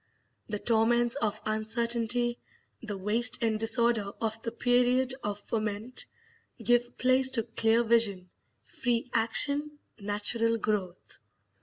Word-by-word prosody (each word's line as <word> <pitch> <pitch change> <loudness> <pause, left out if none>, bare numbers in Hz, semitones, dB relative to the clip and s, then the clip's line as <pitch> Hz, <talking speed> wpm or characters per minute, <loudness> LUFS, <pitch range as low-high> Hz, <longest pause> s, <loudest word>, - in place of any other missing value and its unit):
The 210 - -3
torments 235 +2 +1
of 220 -7 -2
uncertainty, 235 +2 +1 0.4
the 210 -3 -6
waste 225 +5 0
and 220 -1 0
disorder 225 -2 +1
of 225 0 -3
the 230 - -5
period 245 +2 +1
of 205 0 -4
ferment, 220 +2 -3 0.5
give 240 0 0
place 260 +1 +4
to 225 - +1
clear 225 0 +2
vision, 215 -6 +2 0.3
free 245 0 -3
action, 285 +6 +2 0.2
natural 210 +3 0
growth. 200 -4 -4
230 Hz, 115 wpm, -28 LUFS, 215-240 Hz, 0.5 s, place